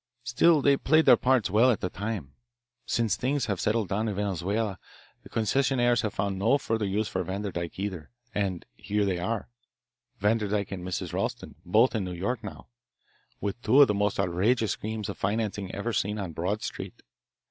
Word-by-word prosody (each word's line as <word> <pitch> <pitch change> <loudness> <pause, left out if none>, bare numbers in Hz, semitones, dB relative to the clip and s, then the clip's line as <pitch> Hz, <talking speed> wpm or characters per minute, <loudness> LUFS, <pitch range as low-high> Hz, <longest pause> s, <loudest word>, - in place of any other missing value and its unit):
Still 140 +6 +4
they 140 -1 +5
played 155 +3 +3
their 125 - +8
parts 125 -4 +2
well 115 +5 +5
at 115 - +2
the 90 - -2
time. 100 -10 -4 0.5
Since 115 -5 +1
things 135 +2 0
have 100 -6 -2
settled 110 -3 0
down 105 +3 0
in 105 - -2
Venezuela, 100 +1 -1 0.4
the - - -14
concessionaires 120 +1 +2
have 110 -2 -2
found 95 -1 -1
no 115 +8 +4
further 110 -6 -1
use 105 +3 0
for 95 - -2
Vanderdyke 95 -2 -4
either, 95 -6 -4 0.2
and 95 -4 -2
here 105 +1 -1
they 95 -3 0
are, 110 +5 -2 0.7
Vanderdyke 105 -1 0
and 95 -2 -5
Mrs. 90 0 -4
Ralston, - - -3
both 110 +9 +4
in 110 -4 -1
New 90 -1 -4
York 110 +7 -2
now, 105 - -8 0.7
with 100 +3 -4
two 125 +5 +4
of - - +4
the 105 - +1
most 105 0 0
outrageous 100 +5 +1
schemes 110 -1 -4
of - - -6
financing 100 -1 -1
ever 115 +4 -3
seen 105 +1 0
on 95 -5 -4
Broad 90 +7 -2
Street. - - -6
105 Hz, 180 wpm, -27 LUFS, 95-115 Hz, 0.7 s, their